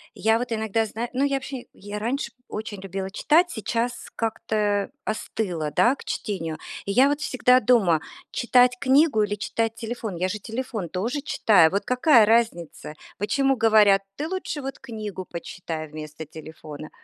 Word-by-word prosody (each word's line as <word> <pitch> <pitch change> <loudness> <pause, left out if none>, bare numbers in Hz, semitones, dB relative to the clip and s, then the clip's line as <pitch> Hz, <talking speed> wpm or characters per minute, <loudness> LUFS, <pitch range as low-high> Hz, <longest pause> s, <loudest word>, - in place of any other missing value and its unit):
я 225 +1 +2
вот 245 0 -4
иногда 220 0 0
знаю 230 +3 -4
ну, 265 +2 +1
я 280 -1 +2
вообще 265 -1 -5
я 205 +1 -7
раньше 235 +2 -2 0.2
очень 210 -2 -6
любила 190 0 -5
читать, 330 - +3
сейчас 235 0 -3
как-то 210 -2 -1 0.2
остыла, 180 -7 -2
да, 240 - +3
к - - -13
чтению. 165 -7 -3 0.3
И 200 - -2
я 255 +7 +5
вот 290 +1 -1
всегда 255 -3 +4
думаю: 205 -10 +3 0.3
читать 245 0 +4
книгу 275 -2 +4
или 205 0 0
читать 225 +1 -2
телефон? 225 -3 -5
Я 180 +2 0
же 210 +3 -4
телефон 225 -4 -4
тоже 230 - -2
читаю. 205 - +4
Вот 200 +3 -2
какая 250 -2 +5
разница? 210 -9 0 0.2
Почему 270 +6 +2
говорят: 215 -3 +5
"Ты 300 - -3
лучше 360 -4 -4
вот 270 0 -6
книгу 215 -7 -6
почитай 165 -2 -6
вместо 155 +1 -8
телефона"? 155 0 -10
220 Hz, 160 wpm, -24 LUFS, 190-250 Hz, 0.3 s, я